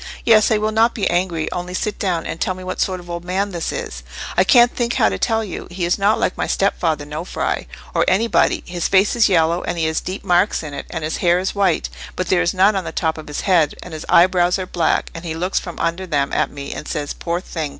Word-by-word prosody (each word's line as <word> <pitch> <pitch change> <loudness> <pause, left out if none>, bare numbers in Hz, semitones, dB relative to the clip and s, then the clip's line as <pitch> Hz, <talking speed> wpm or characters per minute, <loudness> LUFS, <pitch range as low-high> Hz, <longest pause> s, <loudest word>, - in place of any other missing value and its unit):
"Yes, 215 -2 +5
I 220 - +3
will 215 +1 0
not 225 +2 +3
be 210 - 0
angry—only 175 0 -2
sit 210 +2 -2
down, 180 -4 -1
and 165 - -5
tell 185 - 0
me 185 - -9
what 185 0 -4
sort 185 -1 0
of 175 - -13
old 170 0 -5
man 190 +3 -1
this 170 -3 -3
is." - - -5 0.3
"I 185 - +5
can't 240 +4 +5
think 240 -1 0
how 105 - +4
to 95 -1 -4
tell 225 0 +1
you: 195 -5 -6
he 175 0 -3
is 175 +3 0
not 205 +2 +3
like - - 0
my - - -2
stepfather 160 -6 0
Nofri, 155 +4 -3 0.3
or - - +3
anybody. 225 +4 +2
His 175 -1 -2
face 195 +3 +3
is 230 -3 +4
yellow, 170 -1 +2
and - - -3
he 165 - 0
has 160 0 0
deep 185 +2 -6
marks 180 0 +2
in 150 -2 -7
it; - - -6
and 160 -2 -5
his 155 - -2
hair 175 0 +3
is 185 +1 -2
white, 195 -5 +1 0.3
but 185 - -3
there 180 -2 +3
is 175 - +1
none 195 +3 +3
on 190 - -1
the - - -5
top 160 -2 -1
of 155 - -10
his 150 - -4
head: 170 -7 +2
and 180 - -10
his 155 - -7
eyebrows 180 +1 +4
are 185 - -3
black, 170 -2 0
and 165 - -8
he 160 -2 -4
looks 180 +3 0
from 175 - -8
under 170 +3 -2
them 145 -4 0
at - - +1
me, 140 -1 -7
and 150 - -7
says, 145 -1 -3
'Poor 170 0 -3
thing! 160 -5 -4
180 Hz, 260 wpm, -20 LUFS, 165-195 Hz, 0.3 s, Yes